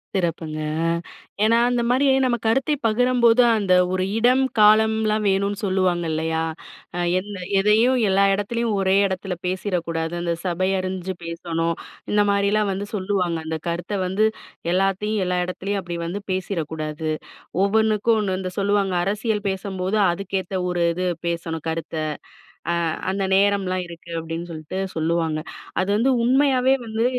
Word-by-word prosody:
சிறப்புங்க. 165 -4 -2 0.3
அ. - - +2 0.5
ஏன்னா 225 +2 +4
அந்தமாரி 245 +2 +2 0.2
நம்ம 240 -2 +1
கருத்தை 265 +6 +2
பகிரம்போது 245 +1 +4 0.2
அந்த 195 -3 +2 0.2
ஒரு 185 0 0
இடம், 250 +3 +4 0.2
காலம்லாம் 215 0 +4
வேணுன்னு 200 +1 0
சொல்லுவாங்க 185 -3 +1
இல்லயா! 160 +1 -1 0.6
அ - - -1 0.2
எந்த 205 +2 -7 0.2
எதையும், 220 +6 +4
எல்லா 195 +1 +4
எடத்துலயும் 220 +2 -1
ஒரே 190 0 +2
எடத்தில 190 0 -3
பேசிறக்கூடாது. 170 -3 -2
அந்த 170 -1 0
சபை 185 +1 0
அறிஞ்சு 185 0 -3
பேசணும். 165 0 -2 0.4
இந்த 210 - +4
மாதிரிலாம் 200 +1 +2
வந்து 200 +2 -4
சொல்லுவாங்க. 185 -4 0
அந்த 160 0 -2
கருத்த 170 +4 -3
வந்து, 195 +4 +2 0.5
எல்லாத்தையும், 195 +3 +1
எல்லா 180 0 0
எடத்துலயும், 195 +2 -3
அப்பிடி 175 -2 -5
வந்து 185 +5 -4
பேசிறக்கூடாது. 160 -4 -3 0.6
ஒவ்வொண்ணுக்கும் 220 +2 +2
ஒண்ணு 190 -3 -1
இந்த 185 -1 -4
சொல்லுவாங்க. 200 -1 +1
"அரசியல் 210 +1 -1
பேசம்போது, 190 +1 -2
அதுக்கேத்த 190 +1 -3 0.2
ஒரு 175 -1 0
இது 185 +1 -2 0.2
பேசணும் 165 -2 -4
கருத்த. 160 0 -4 0.8
அ - - +1 0.4
அந்த 195 0 -1
நேரம்லாம் 195 -2 +2
இருக்கு." 170 0 -12
அப்பிடின்னு 165 +1 -5
சொல்ட்டு 155 +4 -5 0.2
சொல்லுவாங்க. 160 -1 0 0.4
அது 190 - -2
வந்து 260 +5 +3
உண்மையாவே 260 +1 +3
வந்து, 220 +1 0
190 Hz, 135 wpm, -23 LUFS, 175-215 Hz, 0.8 s, ஏன்னா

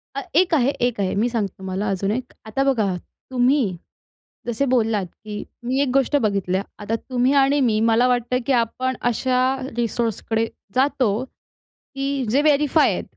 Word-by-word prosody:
हा 275 - -3
एक 355 0 +4
आहे 265 -3 +3 0.2
एक 235 -4 -4
आहे, 190 - 0
मी 220 +5 +1
सांगते 215 -5 -2
तुम्हाला, 190 +2 -3
अजून 195 +1 -1
एक. 250 +3 -4
आता 220 +5 -1
बघा 220 -9 +1 0.4
तुम्ही 250 -5 +2 0.7
जसे 240 +4 0
बोललात, 225 -6 +1
की 210 +4 -8 0.2
मी 260 +2 0
एक 280 - +1
गोष्ट 275 +1 +2
बघितली. 195 -3 0 0.2
आता 210 +2 -2
तुम्ही 250 +3 0
आणि 280 +2 +2
मी 220 -4 +2
मला 240 +3 +4
वाटतं 250 0 +1
की 275 - +3
आपण 255 +2 0
अशा 250 +2 0 0.4
रिसोर्सकडे 230 -1 -1 0.3
जातो, 255 -4 +2
की 275 +1 -7
जे 265 +6 +3
व्हेरिफाय 300 0 +3
आहेत, - - -3
245 Hz, 160 wpm, -22 LUFS, 215-270 Hz, 0.7 s, एक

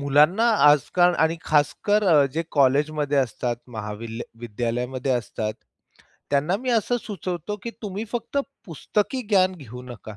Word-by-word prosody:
मुलांना 150 +10 +4 0.2
आजकाल 165 +5 +5
आणि 160 +1 +2
खासकर 180 +8 +2 0.3
जे 165 - 0
कॉलेजमध्ये 145 +1 +2
असतात, 120 -2 -1
महाविल 110 +1 -6 0.2
विद्यालयामध्ये 120 +3 -2
असतात, 110 -2 -2 0.8
त्यांना 150 +7 +2
मी 255 +3 -3
असं 235 +1 +2
सुचवतो 185 0 -5
की 235 - -4
तुम्ही 205 +1 -4
फक्त 240 +4 -2 0.3
पुस्तकी 210 - -2
ज्ञान 190 -3 +4
घेऊ 125 -4 -10
नका. 110 -4 -10
145 Hz, 125 wpm, -24 LUFS, 125-190 Hz, 0.8 s, आजकाल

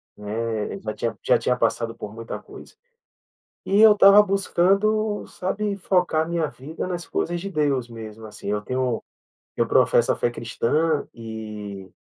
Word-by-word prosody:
né, 105 0 -3
já 110 +1 -4
tinha 115 - -3
já - - +4
tinha 125 0 0
passado 115 0 0
por 105 - -8
muita 115 0 -6
coisa. - - -13 0.9
E 200 +2 +2
eu 220 -1 +9
estava 200 0 +8
buscando, 200 +2 +1
sabe, 200 +2 -3
focar 180 -4 +1
minha 170 -2 0
vida 150 +6 -7
nas 175 -1 -4
coisas 175 0 -2
de 195 +3 -6
Deus 140 -6 0
mesmo, 110 -1 -9
assim. 105 - -9
Eu 105 0 0
tenho 125 0 -1 0.6
eu - - +3
professo - - +4
a - - +2
fé 120 - 0
cristã 140 +7 0
e 105 -4 -8
130 Hz, 155 wpm, -23 LUFS, 110-185 Hz, 0.9 s, eu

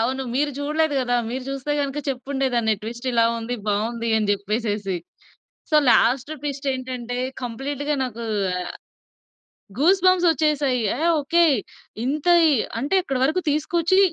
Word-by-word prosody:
అవును. 260 +4 0
మీరు 290 +3 +1
చూడలేదు 300 +1 0
గదా! 245 -1 +1
మీరు 255 +1 -4
చూస్తే 275 +1 -3
గనుక 280 0 -2
చెప్పుండే 270 +1 -2
దాన్ని. 220 -2 +2
ట్విస్ట్ 235 +3 -7
ఇలా 230 -1 +4
ఉంది. 230 +2 -4
బావుంది 230 +3 -1
అని 215 -2 0
జెప్పేసేసి. 205 -1 -1 0.7
సో, 305 - +4
లాస్ట్ 250 +5 +3
ట్విస్టేంటంటే, 260 -4 -3 0.2
కంప్లీట్‌గా 280 +5 -3
నాకూ 235 -2 -4 1.5
గూస్ 365 +7 +4
బంప్సొచ్చేసాయి. 305 -7 +3
యహ్! 315 +7 0
ఓకే. 340 +4 +3 0.6
ఇంత 285 +4 -2 0.2
ఇ - - +4 0.3
అంటే 280 +10 -1
ఇక్కడి 270 -7 -2
వరకు 310 +7 +1
తీసుకొచ్చి, 335 +5 +1
265 Hz, 125 wpm, -23 LUFS, 235-295 Hz, 1.5 s, ఇలా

